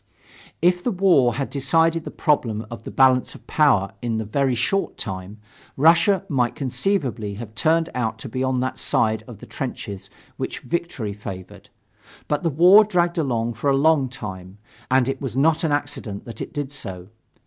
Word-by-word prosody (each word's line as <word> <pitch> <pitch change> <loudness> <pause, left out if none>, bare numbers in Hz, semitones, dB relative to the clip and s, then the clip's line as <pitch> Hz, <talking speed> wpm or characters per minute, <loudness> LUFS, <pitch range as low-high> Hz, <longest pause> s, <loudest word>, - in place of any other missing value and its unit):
If 180 0 +3
the - - +1
war 175 - +3
had 135 +1 -3
decided 160 +4 +1
the - - -4
problem 115 -8 0
of 115 -1 -8
the - - -5
balance 130 -1 +3
of - - -15
power 130 -11 +3
in 115 -2 -1
a 110 - -3
very 130 +4 0
short 195 - -1
time, 95 +1 -6 0.4
Russia 170 +7 +4
might 125 -4 0
conceivably 130 - -1
have 110 0 -8
turned 160 +9 +2
out 120 -3 -2
to - - -8
be 130 +2 -3
on 130 -1 0
that 130 -1 -3
side 110 -1 +1
of 120 -4 -10
the - - -12
trenches 100 -7 -6 0.3
which - - -4
victory 165 -11 -3
favored. 95 -3 -9 0.6
But 150 -1 0
the 170 - +1
war 180 +8 +7
dragged 175 -4 0
along 120 -5 -1
for 115 +6 -1
a 135 - +3
long 145 -2 +3
time, 95 -6 -8 0.3
and 130 -1 +3
it 135 0 -3
was 130 -3 -4
not 155 +4 +3
an 160 - +1
accident 145 -8 -3
that 115 - -9
it - - -6
did 145 -2 -4
so. 95 -9 -6
130 Hz, 180 wpm, -22 LUFS, 110-160 Hz, 0.6 s, war